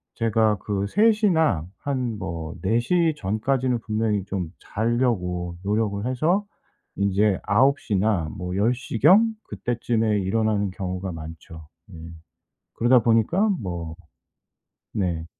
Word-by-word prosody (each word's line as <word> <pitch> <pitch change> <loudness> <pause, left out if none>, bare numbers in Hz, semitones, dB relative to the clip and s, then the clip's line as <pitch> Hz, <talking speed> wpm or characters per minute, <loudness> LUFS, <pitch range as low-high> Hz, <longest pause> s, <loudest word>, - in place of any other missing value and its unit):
제가 110 -2 +2
그 100 0 -2
3:00 215 - +3
나 155 - +2 0.2
한 130 -6 -2
뭐 85 -4 -5
4:00 120 - +2
전까지는 120 +4 0
분명히 110 -2 -1
좀 95 -5 -3
자려고 100 -7 -1
노력을 105 +1 -1
해서 165 +11 +1 0.5
인제 100 0 +2
9:00 125 +2 +2
나 95 -6 +1
뭐 90 0 -4
10:00 115 +2 -1
경 225 +4 +6 0.2
그때쯤에 115 -3 0
일어나는 105 +1 0
경우가 95 0 -4
많죠. 80 -1 -10 0.3
예. - - -9 0.8
그러다 120 +2 +4
보니까 115 - +2
뭐 85 -4 -5 1.0
네. 85 -5 -2
105 Hz, 190 characters per minute, -24 LUFS, 95-125 Hz, 1.0 s, 경